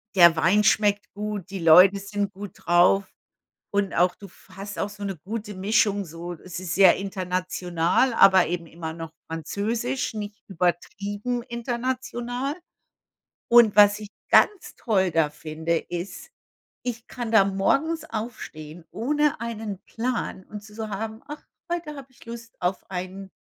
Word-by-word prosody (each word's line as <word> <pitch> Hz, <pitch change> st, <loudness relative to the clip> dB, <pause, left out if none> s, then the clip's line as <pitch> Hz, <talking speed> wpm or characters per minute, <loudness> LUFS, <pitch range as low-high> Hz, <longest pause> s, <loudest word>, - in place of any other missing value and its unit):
der 170 Hz, -2 st, +8 dB
Wein 185 Hz, +6 st, +3 dB
schmeckt 205 Hz, -1 st, +2 dB
gut, 205 Hz, -2 st, -5 dB
die 195 Hz, -1 st, -5 dB
Leute 180 Hz, +4 st, +7 dB
sind 200 Hz, 0 st, -3 dB
gut 200 Hz, 0 st, -8 dB
drauf 180 Hz, +3 st, +4 dB, 0.6 s
und 200 Hz, -1 st, 0 dB
auch 180 Hz, +1 st, +3 dB
du 200 Hz, -, -11 dB
f 190 Hz, -, -21 dB
hast 200 Hz, +1 st, -7 dB
auch 200 Hz, -, -1 dB
so 205 Hz, 0 st, -9 dB
'ne 195 Hz, -3 st, -3 dB
gute 210 Hz, +5 st, -6 dB
Mischung 200 Hz, +1 st, +1 dB
so. 170 Hz, +2 st, -7 dB
Es 175 Hz, +1 st, -9 dB
ist 185 Hz, -2 st, -4 dB
sehr 190 Hz, -2 st, +7 dB
international, 185 Hz, +2 st, 0 dB
aber 190 Hz, -4 st, +6 dB
eben 170 Hz, -1 st, -3 dB
immer 160 Hz, 0 st, -6 dB
noch 165 Hz, -1 st, -8 dB, 0.2 s
französisch, 220 Hz, -, -2 dB
nicht 210 Hz, 0 st, -6 dB
übertrieben 200 Hz, +6 st, -2 dB
international. 245 Hz, +2 st, -3 dB, 0.9 s
Und 235 Hz, -3 st, +6 dB
was 205 Hz, 0 st, +6 dB
ich 210 Hz, -, -8 dB, 0.2 s
ganz 410 Hz, -3 st, +4 dB
toll 190 Hz, -6 st, +1 dB
da 160 Hz, -2 st, +2 dB
finde, 160 Hz, +2 st, -3 dB
ist: 200 Hz, -, -7 dB, 0.5 s
Ich 235 Hz, -1 st, -4 dB
kann 240 Hz, -2 st, -5 dB
da 210 Hz, -3 st, +7 dB
morgens 280 Hz, +12 st, 0 dB
aufstehen 175 Hz, -, -7 dB
ohne 295 Hz, +3 st, 0 dB
einen 220 Hz, -4 st, -5 dB
Plan 230 Hz, -5 st, -3 dB
und 210 Hz, -1 st, -9 dB
zu 210 Hz, 0 st, -14 dB
so 220 Hz, -1 st, -5 dB
haben: 220 Hz, +3 st, -5 dB
„Ach, 295 Hz, +1 st, -8 dB, 0.3 s
heute 310 Hz, -4 st, -4 dB
habe 275 Hz, -1 st, -10 dB
ich 245 Hz, -, -19 dB
Lust 230 Hz, -1 st, -9 dB
auf 180 Hz, +1 st, -2 dB
ein, 185 Hz, +1 st, -6 dB
200 Hz, 150 wpm, -25 LUFS, 180-230 Hz, 0.9 s, der